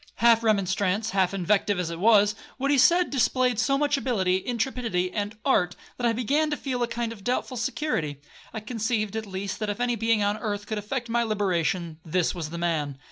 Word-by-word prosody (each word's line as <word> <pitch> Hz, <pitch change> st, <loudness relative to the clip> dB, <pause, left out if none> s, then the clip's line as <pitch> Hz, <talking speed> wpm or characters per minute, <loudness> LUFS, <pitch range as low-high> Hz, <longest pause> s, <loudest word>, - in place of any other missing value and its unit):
Half 230 Hz, 0 st, +5 dB
remonstrance, 200 Hz, -1 st, +1 dB
half 190 Hz, -2 st, +2 dB
invective 195 Hz, +1 st, +1 dB
as 170 Hz, -2 st, -2 dB
it 165 Hz, -, -6 dB
was, 210 Hz, 0 st, +5 dB, 0.2 s
what 275 Hz, +2 st, 0 dB
he 285 Hz, -, +4 dB
said 350 Hz, +6 st, +4 dB
displayed 255 Hz, -3 st, +2 dB
so 275 Hz, +3 st, +2 dB
much 290 Hz, 0 st, +1 dB
ability, 190 Hz, -9 st, 0 dB
intrepidity, 230 Hz, -7 st, -1 dB
and 205 Hz, +1 st, -3 dB
art, 180 Hz, -10 st, +2 dB, 0.2 s
that 240 Hz, -, +1 dB
I -, -, +3 dB
began 280 Hz, +7 st, +1 dB
to 295 Hz, -, -2 dB
feel 255 Hz, -3 st, -3 dB
a 240 Hz, -, +1 dB
kind 230 Hz, 0 st, -3 dB
of 200 Hz, -4 st, -14 dB
doubtful 250 Hz, +2 st, -1 dB
security. 235 Hz, -, -2 dB, 0.3 s
I 220 Hz, -, -5 dB
conceived, 220 Hz, -2 st, -2 dB
at 220 Hz, -1 st, -3 dB
least, 190 Hz, 0 st, -4 dB
that 215 Hz, -1 st, -2 dB
if 205 Hz, -, -3 dB
any 245 Hz, -1 st, +1 dB
being 225 Hz, -1 st, +1 dB
on 205 Hz, +1 st, 0 dB
earth 205 Hz, -2 st, -3 dB
could 215 Hz, 0 st, -3 dB
effect 240 Hz, +4 st, -4 dB
my 235 Hz, +1 st, +1 dB
liberation, 180 Hz, -6 st, -1 dB
this 170 Hz, +1 st, 0 dB
was 165 Hz, -4 st, -5 dB
the 170 Hz, -, -6 dB
man. 155 Hz, -5 st, -1 dB
215 Hz, 205 wpm, -26 LUFS, 190-245 Hz, 0.3 s, Half